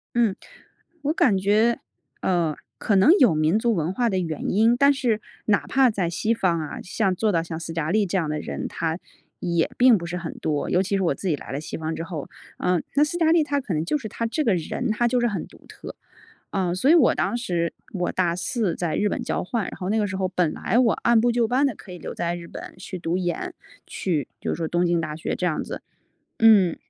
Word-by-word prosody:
嗯。 230 Hz, -5 st, +3 dB, 0.7 s
我 295 Hz, -, +1 dB
感 200 Hz, -, +3 dB
觉， 215 Hz, +5 st, +2 dB, 0.4 s
呃， 170 Hz, -4 st, +1 dB, 0.2 s
可 205 Hz, -, +1 dB
能 280 Hz, -, +6 dB
有 240 Hz, -10 st, +6 dB
民 155 Hz, +5 st, +2 dB
族 230 Hz, +1 st, +1 dB
文 170 Hz, 0 st, -1 dB
化 240 Hz, +3 st, +1 dB
的 190 Hz, -3 st, 0 dB
原 160 Hz, -4 st, -3 dB
因， 225 Hz, +4 st, +4 dB
但 280 Hz, +3 st, +5 dB
是 235 Hz, -5 st, 0 dB, 0.2 s
哪 205 Hz, -2 st, +2 dB
怕 265 Hz, -1 st, +4 dB
在 195 Hz, -6 st, -1 dB
西 215 Hz, +6 st, 0 dB
方 180 Hz, -7 st, +1 dB
啊， 155 Hz, -2 st, -5 dB
像 190 Hz, 0 st, 0 dB
做 215 Hz, +3 st, +1 dB
到 165 Hz, -2 st, +2 dB
像 165 Hz, -1 st, -6 dB
斯 165 Hz, 0 st, -6 dB
嘉 165 Hz, -2 st, -2 dB
丽 210 Hz, 0 st, +3 dB
这 190 Hz, +1 st, -1 dB
样 160 Hz, -4 st, -1 dB
的 150 Hz, -, -2 dB
人， -, -, -4 dB
她 165 Hz, +1 st, -3 dB, 0.4 s
也 170 Hz, -2 st, 0 dB
并 245 Hz, -3 st, +6 dB
不 170 Hz, -, -6 dB
是 175 Hz, +1 st, -4 dB
很 170 Hz, -2 st, -5 dB
多， 150 Hz, -2 st, -1 dB
尤 180 Hz, -, +3 dB
其 195 Hz, +1 st, 0 dB
是 190 Hz, -, 0 dB
我 165 Hz, -, +1 dB
自 190 Hz, -, -3 dB
己 150 Hz, -, +2 dB
来 -, -, -9 dB
了 140 Hz, +3 st, -3 dB
西 -, -, -6 dB
方 160 Hz, 0 st, -3 dB
之 165 Hz, -, -4 dB
后。 165 Hz, -4 st, -6 dB, 0.3 s
呃， 180 Hz, -2 st, +1 dB
那 290 Hz, -, +5 dB
斯 345 Hz, +3 st, -3 dB
嘉 325 Hz, -1 st, +3 dB
丽 335 Hz, -1 st, +5 dB
她 285 Hz, -1 st, -1 dB
可 205 Hz, -9 st, -4 dB
能 155 Hz, +1 st, -1 dB
就 300 Hz, -, +1 dB
是 235 Hz, -, -6 dB
她 230 Hz, -, -3 dB
这 300 Hz, +7 st, -1 dB
个 220 Hz, -, +3 dB
人， 200 Hz, +9 st, -3 dB
她 240 Hz, +2 st, +1 dB
就 245 Hz, +1 st, +1 dB
是 240 Hz, -, +3 dB
很 205 Hz, -4 st, -3 dB
独 -, -, -19 dB
特。 -, -, -10 dB, 0.6 s
呃， 180 Hz, -2 st, 0 dB
所 255 Hz, +10 st, +2 dB
以 -, -, +8 dB
我 310 Hz, -8 st, +5 dB
当 240 Hz, -, 0 dB
时 175 Hz, -8 st, -1 dB, 0.2 s
我 180 Hz, -2 st, -1 dB
大 175 Hz, -2 st, +1 dB
4 210 Hz, -1 st, -1 dB
在 170 Hz, -3 st, -2 dB
日 210 Hz, -, +2 dB
本 -, -, -3 dB
交 -, -, -2 dB
换， 225 Hz, +3 st, -2 dB
然 -, -, -6 dB
后 185 Hz, -, -4 dB
那 220 Hz, -, +2 dB
个 210 Hz, -, +1 dB
时 190 Hz, -1 st, -4 dB
候 190 Hz, -1 st, 0 dB
本 180 Hz, -4 st, 0 dB
来 240 Hz, -, 0 dB
我 240 Hz, -3 st, +4 dB
按 235 Hz, -1 st, +3 dB
部 240 Hz, +1 st, +2 dB
就 235 Hz, -2 st, +1 dB
班 265 Hz, +3 st, +3 dB
地 255 Hz, -, -1 dB
可 195 Hz, -, -14 dB
以 180 Hz, -, -8 dB
留 -, -, -7 dB
在 170 Hz, 0 st, -2 dB
日 170 Hz, -, -9 dB
本 -, -, -9 dB
去 185 Hz, 0 st, -7 dB
读 170 Hz, +1 st, -1 dB
研， 175 Hz, -1 st, -2 dB, 0.3 s
去 160 Hz, -8 st, -2 dB
就 -, -, -2 dB
是 -, -, 0 dB
说 165 Hz, -1 st, -2 dB
东 175 Hz, 0 st, +1 dB
京 170 Hz, 0 st, +2 dB
大 155 Hz, -2 st, -4 dB
学 160 Hz, -, -3 dB
这 -, -, -3 dB
样 160 Hz, -4 st, 0 dB
子， -, -, -7 dB, 0.6 s
嗯， 205 Hz, -7 st, +6 dB
190 Hz, 270 characters per minute, -24 LUFS, 170-230 Hz, 0.7 s, 以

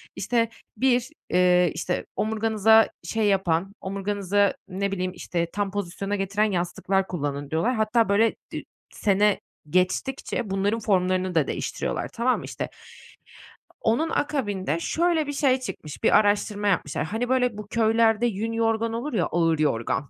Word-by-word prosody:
İşte, 230 Hz, -2 st, 0 dB, 0.3 s
bir, 250 Hz, +1 st, +2 dB, 0.2 s
eee, 180 Hz, -1 st, +4 dB
işte 180 Hz, -, -2 dB
omurganıza 220 Hz, 0 st, +3 dB
şey 220 Hz, -1 st, 0 dB
yapan, 190 Hz, -1 st, +1 dB
omurganızı, 200 Hz, 0 st, 0 dB
ne 195 Hz, +1 st, -2 dB
bileyim, 185 Hz, -1 st, -2 dB
işte, 170 Hz, -1 st, -2 dB
tam 205 Hz, -1 st, -1 dB
pozisyona 200 Hz, +1 st, -3 dB
getiren 200 Hz, +2 st, 0 dB
yastıklar 185 Hz, +2 st, 0 dB
kullanın 145 Hz, -4 st, -3 dB
diyorlar. 195 Hz, +11 st, +1 dB
Hatta, 220 Hz, +1 st, +2 dB
böyle, 220 Hz, +3 st, +3 dB, 0.2 s
dü -, -, -3 dB, 0.3 s
sene 205 Hz, 0 st, +2 dB, 0.3 s
geçtikçe 205 Hz, -, -1 dB
bunların 200 Hz, +3 st, 0 dB
formlarını 185 Hz, -3 st, +1 dB
da 160 Hz, -3 st, +3 dB
değiştiriyorlar, -, -, -3 dB
tamam 245 Hz, +2 st, +1 dB
mı? -, -, -8 dB
İşte, -, -, -5 dB, 1.1 s
onun 240 Hz, +9 st, +1 dB
akabinde 205 Hz, -, -1 dB
şöyle 325 Hz, -, +1 dB
bir 290 Hz, -, -3 dB
şey 270 Hz, -2 st, +2 dB
çıkmış, 155 Hz, -, -7 dB
bir -, -, +6 dB
araştırma 205 Hz, 0 st, +1 dB
yapmışlar. 150 Hz, -6 st, 0 dB
Hani, 225 Hz, +8 st, -3 dB
böyle, 250 Hz, -4 st, +1 dB
bu 210 Hz, -1 st, -7 dB
köylerde 225 Hz, 0 st, +3 dB
yün 225 Hz, 0 st, -1 dB
yorgan 225 Hz, 0 st, 0 dB
olur 245 Hz, +6 st, -3 dB
ya, 180 Hz, -7 st, +1 dB
ağır 165 Hz, -2 st, +1 dB
yorgan. 140 Hz, -1 st, 0 dB
205 Hz, 145 wpm, -25 LUFS, 185-230 Hz, 1.1 s, bir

